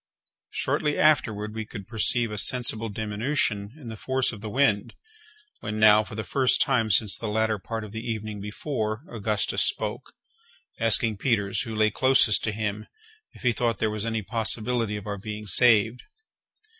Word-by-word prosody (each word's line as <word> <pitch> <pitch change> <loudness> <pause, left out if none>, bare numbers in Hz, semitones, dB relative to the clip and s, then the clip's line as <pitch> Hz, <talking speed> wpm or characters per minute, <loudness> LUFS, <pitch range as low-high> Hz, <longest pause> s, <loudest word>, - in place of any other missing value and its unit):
Shortly 150 -1 -1
afterward 110 -9 +1
we 110 0 -4
could 105 -3 -10
perceive 115 +1 +1
a 105 - 0
sensible 115 -1 +2
diminution 105 0 -2
in 125 -6 -9
the 110 - -7
force 130 +4 -1
of 110 -4 -10
the 110 - -6
wind, 115 -4 0 0.6
when, 105 0 -5
now 110 0 +6
for 105 - -10
the 110 - -4
first 130 +1 +2
time 120 -5 +1
since 100 0 +3
the 115 - -4
latter 110 0 0
part 115 +3 -6
of 105 - -9
the 110 +1 -6
evening 110 -3 -5
before, 110 +1 -4
Augustus 110 -2 -1
spoke, - - -2 0.7
asking 115 -1 +5
Peters, 105 -4 0
who 115 -3 -5
lay 110 0 +2
closest 130 -3 +3
to 110 - -1
him, 105 0 -4 0.5
if - - -16
he 125 - +3
thought 115 -2 -1
there 110 +1 -1
was 105 -1 -4
any 110 -1 -2
possibility 115 0 -1
of 105 - -9
our 100 -1 -5
being 105 +1 -7
saved. 115 +3 +3
110 Hz, 170 wpm, -25 LUFS, 105-120 Hz, 0.7 s, now